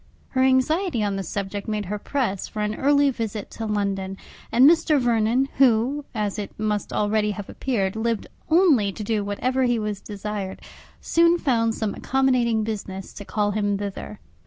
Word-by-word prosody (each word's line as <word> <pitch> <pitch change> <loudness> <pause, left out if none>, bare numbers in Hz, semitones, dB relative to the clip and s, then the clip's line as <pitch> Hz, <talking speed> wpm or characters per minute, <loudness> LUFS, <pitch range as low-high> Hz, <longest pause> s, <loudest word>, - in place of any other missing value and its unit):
Her 260 - 0
anxiety 265 - +2
on 200 -1 0
the 195 - -2
subject 200 +2 -4
made 210 -1 -2
her 205 +3 -4
press 230 -7 -2
for 210 - -4
an 210 0 -1
early 285 +3 +3
visit 220 -4 -5
to 225 - -5
London; 195 -2 -2 0.3
and 255 +3 +7
Mr. 320 -2 +4
Vernon, 240 +1 +2
who, 265 +3 +3
as 210 -1 -2
it 205 - -7
must 210 -1 -1
already 210 0 +1
have 205 -1 -5
appeared, 200 -7 -2
lived 225 0 -1 0.2
only 315 - +4
to 210 - -7
do 210 0 0
whatever 255 +6 -1
he 240 -1 +2
was 210 -2 -3
desired, 205 -2 -5 0.4
soon 335 +1 +4
found 230 -7 +1
some 215 -2 -2
accommodating 250 -4 +1
business 195 -3 -5
to 205 - -9
call 205 0 0
him 205 -1 0
thither. 200 +1 -6
215 Hz, 170 wpm, -24 LUFS, 205-260 Hz, 0.4 s, and